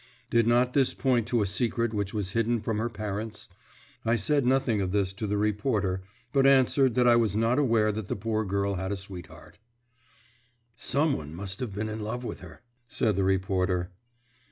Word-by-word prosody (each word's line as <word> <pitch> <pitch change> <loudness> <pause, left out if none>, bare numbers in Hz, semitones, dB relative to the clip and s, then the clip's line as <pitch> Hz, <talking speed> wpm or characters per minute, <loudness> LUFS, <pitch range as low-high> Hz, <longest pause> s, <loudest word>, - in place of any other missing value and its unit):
Did 115 -1 +3
not 125 +1 +3
this 135 -3 +2
point 125 -4 +1
to 120 -3 +2
a - - -1
secret 115 +2 0
which 100 -2 -2
was 100 -3 -3
hidden 115 +2 +1
from 110 0 -2
her 115 +2 -1
parents? 105 0 -5 0.6
I 115 +1 +2
said 130 +5 +1
nothing 130 -5 +2
of 95 -1 -1
this 100 -1 0
to 105 +2 -4
the 105 +1 0
reporter, 105 -2 0 0.3
but 135 -1 +4
answered 130 -2 +4
that 125 -1 +4
I 120 - +7
was 110 -4 +2
not 115 +5 +2
aware 115 -6 +3
that 105 -1 -5
the - - -2
poor 110 +1 -1
girl 100 0 -1
had 95 +2 -3
a 100 - -2
sweetheart. 95 0 -10 1.2
"Some 145 +5 +1
one 75 +1 -7
must 95 +1 -4
have 115 -6 -4
been 105 +2 -2
in 110 0 -5
love 110 +4 -4
with - - -5
her," - - -13 0.2
said 110 -3 0
the 95 - +1
reporter. 95 -1 0
110 Hz, 195 wpm, -27 LUFS, 100-120 Hz, 1.2 s, I